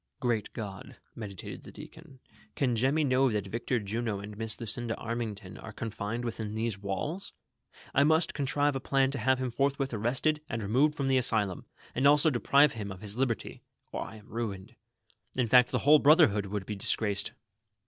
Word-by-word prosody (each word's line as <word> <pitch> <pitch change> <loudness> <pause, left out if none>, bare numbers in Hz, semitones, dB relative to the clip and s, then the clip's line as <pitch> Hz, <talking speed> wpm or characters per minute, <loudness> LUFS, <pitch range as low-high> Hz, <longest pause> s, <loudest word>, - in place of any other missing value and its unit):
" - - -54
Great 120 -5 -1
God," 100 -3 -7 0.2
meditated 100 -5 -7
the - - -12
deacon, 160 -4 -12 0.4
"can 125 -4 +1
Jemmy 135 +7 +2
know 130 -1 +3
that 105 -3 -1
Victor 115 +4 -1
Juno 110 0 -2
and 105 +1 -8
Miss 110 +1 -2
Lucinda 115 0 -2
Annington 110 -5 -5
are 110 - -7
con 115 +1 -5
fined 115 +3 -4
within 110 -2 -4
these 110 -2 -2
walls! 105 - -3 0.6
I 140 - +5
must 160 +3 +3
contrive 145 0 +1
a - - -1
plan 135 0 +2
to 140 - -3
have 130 +3 +3
him 130 -1 -2
fortliwith 135 +1 0
arrested 130 +8 0
and 115 -1 -3
removed 135 +9 +2
from 140 -2 -1
the 130 -1 +4
Asylum, 110 -6 -1 0.3
and 130 +3 +3
also 150 +2 +6
deprive 140 +3 +4
him 105 -3 -5
of 95 0 -9
his 105 -1 -4
liberty, 125 -3 -2 0.3
or - - -3
I 110 - -7
am 105 0 -14
ruined; 110 -1 -5 0.6
in 125 - +2
fact, 125 +2 +6
the - - 0
whole 150 +1 +8
brotlierhood 140 - +5
would 100 0 -4
be 105 - -4
disgraced 100 0 0
120 Hz, 190 wpm, -30 LUFS, 105-135 Hz, 0.6 s, whole